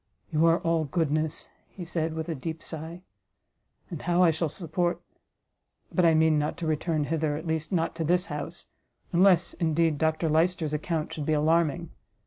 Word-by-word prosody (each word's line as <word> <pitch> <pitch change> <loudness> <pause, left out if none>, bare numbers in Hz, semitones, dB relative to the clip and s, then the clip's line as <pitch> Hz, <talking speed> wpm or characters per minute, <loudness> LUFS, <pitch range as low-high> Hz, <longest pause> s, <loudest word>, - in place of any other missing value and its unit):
"You 160 +1 +3
are 165 0 +5
all 165 -1 +1
goodness," 155 0 -1 0.3
said 165 -1 -2
he, 160 - -7
with 160 - -3
a 165 - -2
deep 160 +3 -6
sigh; 165 +2 -7 0.9
"and 165 - -5
how 175 +1 +2
I 170 - +6
shall 160 0 -1
support 175 +2 -1 0.9
but 180 - +3
I 165 -1 +5
mean 160 -1 +4
not 150 +1 -2
to 170 - -4
return 155 0 0
hither, 155 0 -1
at 160 - -7
least 160 -1 -2
not 165 -3 0
to 165 - -1
this 180 +3 +2
house, 150 -3 -6 0.5
unless, 180 0 +4
indeed, 160 -2 +1
Dr 160 +1 +1
Lyster's 160 0 +1
account 155 +1 -2
should 150 -2 -5
be 155 - +2
alarming. 160 +1 +1
160 Hz, 175 wpm, -27 LUFS, 155-170 Hz, 0.9 s, I